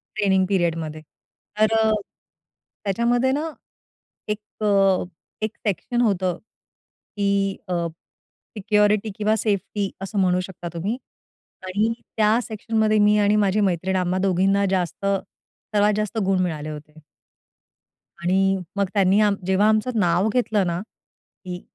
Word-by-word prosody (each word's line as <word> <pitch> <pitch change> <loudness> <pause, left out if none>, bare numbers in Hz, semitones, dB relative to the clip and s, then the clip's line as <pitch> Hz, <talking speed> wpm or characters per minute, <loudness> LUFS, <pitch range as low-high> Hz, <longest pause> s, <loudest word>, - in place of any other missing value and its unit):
Training 190 -3 +2
पिरियडमध्ये. 165 -4 -1 0.6
तर 215 +1 +4
अ, 220 0 +3 0.9
त्याच्यामध्ये 240 +6 +1
ना 305 +4 -1 0.8
एक 210 0 -2 0.2
अ, 195 -2 +3 0.4
एक 215 +1 -2
सेक्शन 240 +5 -1
होतं, 190 -6 +1 0.8
की 200 -1 +1
अ, 170 -2 -1 0.7
सिक्युरिटी 210 +1 +2
किंवा 215 +1 +2
सेफ्टी 205 -1 -1
असं 195 +1 -3
म्हणू 180 -1 +3
शकता 175 -1 -8
तुम्ही. 200 +9 -2 0.7
आणि 210 +5 +1 0.2
त्या 215 +1 +4
सेक्शनमध्ये 220 0 0
मी 210 0 +5
आणि 205 +1 +3
माझी 205 0 +2
मैत्रीण 190 0 0
आम्हा 185 0 0
दोघींना 195 +1 +2
जास्त, 185 +1 -1
सर्वात 205 +1 -1
जास्त 215 +1 -2
गुण 190 -1 +2
मिळाले 155 -3 -3
होते. 150 +1 -10 1.2
आणि 195 +2 +2 0.2
मग 200 -1 +2
त्यांनी 195 0 +4
आम 205 -1 +3
जेव्हा 195 +3 +3
आमचं 220 +2 +1
नाव 180 +3 +2
घेतलं 225 -5 +1
ना, 170 0 -1 0.7
की 180 0 -6
200 Hz, 125 wpm, -23 LUFS, 185-215 Hz, 1.2 s, मी